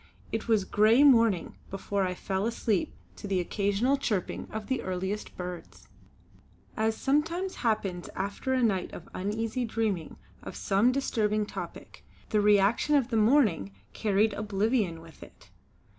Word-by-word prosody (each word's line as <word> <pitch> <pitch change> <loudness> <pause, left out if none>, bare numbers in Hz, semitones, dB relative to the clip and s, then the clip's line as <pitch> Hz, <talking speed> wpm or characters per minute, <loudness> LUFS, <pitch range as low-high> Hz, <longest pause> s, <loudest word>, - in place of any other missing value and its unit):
It 225 +1 -3
was 215 -4 +2
grey 220 +8 +4
morning 230 - +4
before 195 0 -2
I 180 - -3
fell 195 +3 -2
asleep 225 -4 0 0.3
to - - -7
the 195 -2 +1
occasional 205 +8 +1
chirping 210 -9 -2
of 215 -1 -5
the 260 +2 -1
earliest 190 +3 -4
birds. 180 -1 -8 0.9
As 220 0 0
sometimes 335 +7 0
happens 205 -6 -1
after 200 +7 -3
a 260 -1 +2
night 195 -5 +1
of 170 - -9
uneasy 220 +6 -2
dreaming 220 -7 -2 0.3
of - - -8
some 205 +5 +2
disturbing 215 -5 0
topic, - - -8 0.3
the 210 - +2
reaction 210 +8 +3
of 265 -4 +2
the 230 - -1
morning 215 - +3 0.2
carried 210 0 +1
oblivion 205 -3 0
with 165 -1 -16
it. - - -15
210 Hz, 145 wpm, -28 LUFS, 195-235 Hz, 0.9 s, grey